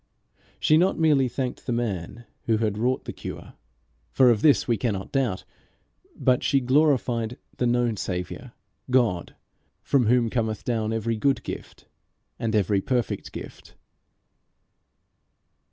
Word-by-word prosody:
She 155 Hz, -, +4 dB
not 185 Hz, +2 st, +2 dB
merely 150 Hz, -5 st, +3 dB
thanked 125 Hz, +1 st, -4 dB
the -, -, 0 dB
man 115 Hz, -2 st, -3 dB, 0.2 s
who 110 Hz, -1 st, +3 dB
had 110 Hz, -2 st, 0 dB
wrought 125 Hz, +4 st, 0 dB
the -, -, -5 dB
cure, -, -, -8 dB, 0.6 s
for 130 Hz, -2 st, +5 dB
of 110 Hz, -3 st, +1 dB
this 150 Hz, -3 st, +4 dB
we 120 Hz, -, +2 dB
cannot 100 Hz, -3 st, -3 dB
doubt; 125 Hz, -9 st, 0 dB, 0.7 s
but 125 Hz, -1 st, +2 dB
she 140 Hz, -, +2 dB
glorified 125 Hz, -4 st, +1 dB, 0.2 s
the 125 Hz, -, +1 dB
known 120 Hz, -2 st, +1 dB
Saviour, 90 Hz, -2 st, -5 dB, 0.4 s
God, 120 Hz, -9 st, +1 dB, 0.5 s
from 130 Hz, -5 st, +2 dB
whom 120 Hz, -1 st, +3 dB
cometh 110 Hz, -4 st, -1 dB
down 110 Hz, -3 st, -1 dB
every 115 Hz, 0 st, -1 dB
good 135 Hz, +5 st, +1 dB
gift -, -, -8 dB, 0.5 s
and 115 Hz, -1 st, -1 dB
every 100 Hz, -1 st, +2 dB
perfect 125 Hz, +1 st, -2 dB
gift. -, -, -10 dB
120 Hz, 135 wpm, -25 LUFS, 110-130 Hz, 0.7 s, for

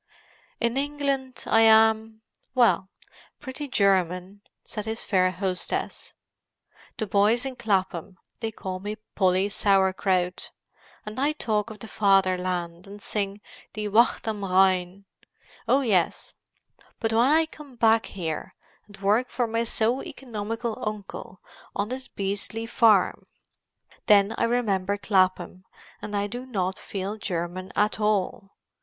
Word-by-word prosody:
"In 235 Hz, +1 st, 0 dB
England 275 Hz, -2 st, -2 dB
I 225 Hz, -, +4 dB
am—well, 220 Hz, 0 st, +3 dB, 0.5 s
pretty 285 Hz, +1 st, -6 dB
German," 190 Hz, -3 st, +1 dB, 0.2 s
said 210 Hz, -2 st, -5 dB
his 220 Hz, +1 st, -3 dB
fair 185 Hz, -3 st, +3 dB
hostess. 185 Hz, 0 st, -3 dB, 0.8 s
"The 220 Hz, -, -1 dB
boys 210 Hz, +5 st, +2 dB
in 265 Hz, -1 st, -4 dB
Clapham, 190 Hz, -5 st, -1 dB, 0.2 s
they 225 Hz, -, -2 dB
call 190 Hz, -4 st, -6 dB
me 205 Hz, +3 st, -4 dB, 0.2 s
Polly 190 Hz, 0 st, +2 dB
Sauer 195 Hz, -2 st, +2 dB
Kraut. 185 Hz, -2 st, -1 dB, 0.6 s
And 215 Hz, +4 st, -6 dB
I 290 Hz, +3 st, +2 dB
talk 215 Hz, -7 st, -1 dB
of 215 Hz, -, -9 dB
the 225 Hz, -, -9 dB
Fatherland, 185 Hz, -4 st, +1 dB
and 200 Hz, +1 st, -10 dB
sing 200 Hz, 0 st, -3 dB, 0.3 s
'Die 210 Hz, -1 st, -3 dB
Wacht 230 Hz, +3 st, +3 dB
am 210 Hz, -2 st, -2 dB
Rhein.' 185 Hz, 0 st, +2 dB, 0.6 s
Oh 260 Hz, +4 st, +4 dB
yes. 195 Hz, -10 st, +1 dB, 0.7 s
But 225 Hz, 0 st, 0 dB
when 225 Hz, -, +4 dB
I 315 Hz, +3 st, +4 dB
come 300 Hz, -4 st, -13 dB
back 225 Hz, -1 st, +3 dB
here 165 Hz, -5 st, -5 dB, 0.3 s
and 205 Hz, -, -14 dB
work 215 Hz, +6 st, +2 dB
for 240 Hz, 0 st, 0 dB
my 230 Hz, 0 st, -1 dB
so 235 Hz, +3 st, +1 dB
economical 230 Hz, -1 st, -5 dB
uncle 205 Hz, -3 st, -6 dB, 0.3 s
on 205 Hz, +2 st, -1 dB
this 260 Hz, +1 st, -5 dB
beastly 200 Hz, +3 st, -3 dB
farm, 220 Hz, -5 st, +3 dB, 0.8 s
then 205 Hz, 0 st, +5 dB
I -, -, +1 dB
remember 205 Hz, -5 st, 0 dB
Clapham 185 Hz, -2 st, +1 dB, 0.4 s
and 205 Hz, -1 st, -3 dB
I 200 Hz, -, 0 dB
do 245 Hz, +5 st, -6 dB
not 190 Hz, -6 st, -2 dB
feel 200 Hz, +2 st, -5 dB
German 180 Hz, -1 st, -4 dB
at 210 Hz, +1 st, +1 dB
all. 205 Hz, -2 st, -1 dB
210 Hz, 130 wpm, -26 LUFS, 190-230 Hz, 0.8 s, then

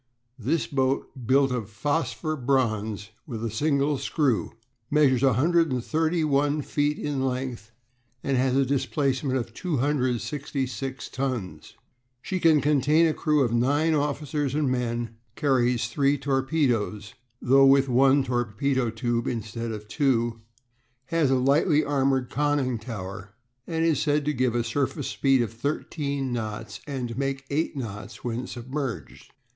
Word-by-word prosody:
This 145 Hz, +9 st, 0 dB
boat, 135 Hz, -1 st, 0 dB, 0.2 s
built 135 Hz, +1 st, +4 dB
of 115 Hz, -5 st, -3 dB
phosphor 155 Hz, +6 st, -1 dB
bronze, 110 Hz, -6 st, -1 dB, 0.2 s
with 115 Hz, -4 st, -4 dB
a 115 Hz, -, -2 dB
single 140 Hz, +3 st, +1 dB
screw, 140 Hz, -8 st, 0 dB, 0.4 s
measures 140 Hz, -4 st, +3 dB
131 150 Hz, +1 st, +2 dB
feet 145 Hz, +1 st, 0 dB
in 140 Hz, -3 st, -2 dB
length 125 Hz, -4 st, -3 dB, 0.5 s
and 140 Hz, -, 0 dB
has 130 Hz, 0 st, +2 dB
a 135 Hz, 0 st, +3 dB
displacement 135 Hz, 0 st, 0 dB
of 115 Hz, -2 st, -4 dB
266 135 Hz, -, -2 dB
tons; 130 Hz, -8 st, -4 dB, 0.4 s
she 185 Hz, +8 st, -3 dB
can 160 Hz, -4 st, +5 dB
contain 150 Hz, +2 st, +3 dB
a 160 Hz, -, +2 dB
crew 150 Hz, -2 st, +2 dB
of 120 Hz, -2 st, 0 dB
nine 145 Hz, +7 st, +2 dB
officers 145 Hz, -1 st, -1 dB
and 150 Hz, -4 st, +1 dB
men, 120 Hz, -2 st, -2 dB, 0.2 s
carries 125 Hz, -5 st, +2 dB
three 140 Hz, +5 st, +1 dB
torpedoes 130 Hz, -7 st, 0 dB, 0.3 s
though 135 Hz, +2 st, +5 dB
with 135 Hz, 0 st, +5 dB
one 135 Hz, +2 st, +4 dB
torpedo 120 Hz, +1 st, 0 dB
tube 115 Hz, +1 st, -1 dB
instead 115 Hz, 0 st, -3 dB
of 105 Hz, -1 st, -7 dB
two 120 Hz, -3 st, 0 dB, 0.7 s
has 165 Hz, -4 st, +2 dB
a 135 Hz, -, +3 dB
lightly 145 Hz, +4 st, +3 dB
armoured 135 Hz, -3 st, +1 dB
conning 145 Hz, -5 st, 0 dB
tower, 105 Hz, -2 st, -7 dB, 0.3 s
and 165 Hz, -1 st, 0 dB
is 160 Hz, -4 st, +2 dB
said 145 Hz, -1 st, +1 dB
to 150 Hz, -, +1 dB
give 125 Hz, -2 st, 0 dB
a 120 Hz, -, +1 dB
surface 135 Hz, +4 st, -2 dB
speed 135 Hz, -3 st, +2 dB
of 115 Hz, -, -5 dB
thirteen 140 Hz, +1 st, -3 dB
knots 110 Hz, -3 st, -5 dB
and 130 Hz, -4 st, -3 dB
to 115 Hz, +2 st, -5 dB
make 135 Hz, -1 st, -2 dB
eight 150 Hz, 0 st, -1 dB
knots 110 Hz, -5 st, -7 dB
when 120 Hz, +1 st, -3 dB
submerged. 130 Hz, +1 st, -6 dB
135 Hz, 135 wpm, -26 LUFS, 120-145 Hz, 0.7 s, can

